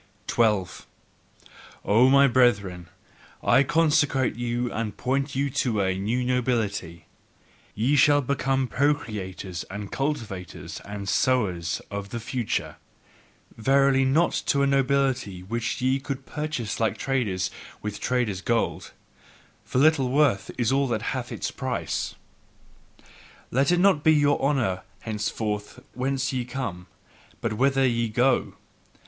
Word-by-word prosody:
12. 105 -6 0 1.0
O 115 +5 +5
my 140 +1 +6
brethren, 100 -9 +2 0.5
I - - +5
consecrate 145 -3 +2
you 120 +1 -2
and 110 -1 -3
point 135 +2 -1
you 140 +1 0
to 115 -4 0
a 95 -1 +1
new 110 +6 -1
nobility: 110 -9 -1 0.7
ye 125 +7 +2
shall 145 0 +5
become 135 0 0
procreators 105 - -2
and 100 0 -6
cultivators 115 -10 -4
and 100 -1 -6
sowers 95 -11 0
of 100 0 -5
the 115 - -4
future; 120 0 -3 0.8
Verily, 135 +3 +3
not 150 +6 +3 0.2
to 140 -1 +3
a - - +4
nobility 135 -8 +1
which 115 +4 -3
ye 130 +1 +2
could 135 0 -5
purchase 150 -9 -4
like 110 -1 0
traders 105 -8 -1 0.3
with 105 -1 -4
traders' 120 -7 -1
gold; 115 +1 -1 0.7
for - - -4
little 140 -2 +4
worth 135 -6 +2
is 120 -1 +1
all 135 0 +2
that 110 -3 -2
hath 130 -2 -4
its - - -3
price. - - -3 1.4
Let 135 +5 +2
it 175 - +3
not 180 -6 +4
be 160 - +6
your 145 -1 +3
honour 130 -10 +1 0.2
henceforth 105 -1 -3
whence 135 +1 -1
ye 125 -1 -1
come, 115 -9 -5 0.5
but 115 - -2
whither 135 +4 +2
ye 115 -2 +1
go! 125 +4 +1
125 Hz, 130 wpm, -25 LUFS, 105-135 Hz, 1.4 s, my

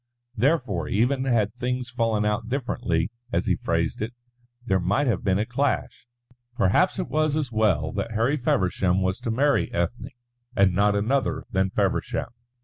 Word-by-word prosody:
Therefore, 110 - +1
even 130 +6 +1
had 110 -5 +1
things 125 0 -3
fallen 115 -3 0
out 110 +2 -1
differently, 120 - -1 0.2
as - - 0
he - - +2
phrased - - -1
it, 110 +3 -3 0.5
there 95 -4 +2
might 100 +11 +1
have 115 -8 0
been 95 -2 +2
a 105 - 0
clash. 125 +1 -2 0.5
Perhaps 110 - +2
it 185 - -2
was 155 -1 +1
as 150 -5 -1
well 95 -9 +1
that 105 +3 -3
Harry 115 +6 +2
Feversham 95 -7 +1
was 95 0 -1
to - - -4
marry 140 +5 +2
Ethne 85 +8 -2 0.5
and 95 -2 +4
not 100 +2 +3
another 135 +5 0
than 95 -2 +1
Feversham. - - -1
110 Hz, 160 wpm, -25 LUFS, 95-130 Hz, 0.5 s, and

